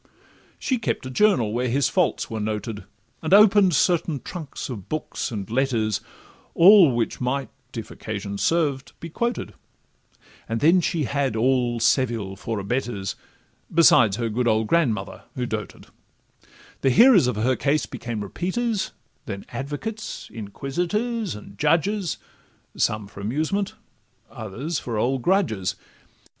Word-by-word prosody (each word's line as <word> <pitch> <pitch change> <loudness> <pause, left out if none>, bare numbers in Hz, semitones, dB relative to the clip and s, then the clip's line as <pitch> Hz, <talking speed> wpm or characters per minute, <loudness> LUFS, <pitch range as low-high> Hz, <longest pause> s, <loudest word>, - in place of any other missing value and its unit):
She 255 -3 -1
kept 220 - -2
a 130 - -5
journal, 130 - +3
where 125 +2 0
his 140 +4 +2
faults 180 -4 +1
were 110 - -4
noted, 105 -1 -4 0.4
And 165 +4 +4
open'd 200 -4 +6
certain 165 -2 +2
trunks 165 -6 -7
of 110 -8 -8
books 155 0 -3
and 100 -5 -5
letters, 115 -3 0 0.5
All 175 - +8
which 115 +1 -2
might, 135 +2 -1 0.3
if 115 - -6
occasion 100 -2 -5
served, 145 -5 0
be 165 - -8
quoted; 240 +7 -2 1.0
And 115 0 -1
then 170 +6 +5
she 165 -2 0
had 140 -2 -1
all 120 0 +1
Seville 115 -5 +1
for 115 +2 -4
abettors, 100 -1 -2 0.6
Besides 125 -11 +6
her 120 -1 -1
good 120 +3 -1
old 110 0 +2
grandmother 110 -9 0
(who 125 -2 -2
doted); 110 -2 -5 1.0
The 135 - +3
hearers 215 - +6
of 125 - 0
her 120 +5 +1
case 145 +1 +1
became 115 -3 -5
repeaters, 195 - -2 0.3
Then 100 -3 -6
advocates, 210 +11 -5
inquisitors, 175 - -2
and 105 - -12
judges, 170 +4 +1 0.6
Some 105 -1 0
for 100 0 -13
amusement, 155 - -1 0.6
others 120 - -4
for 115 -3 -4
old 130 +4 0
grudges. 155 - +1
130 Hz, 135 wpm, -24 LUFS, 110-170 Hz, 1.0 s, All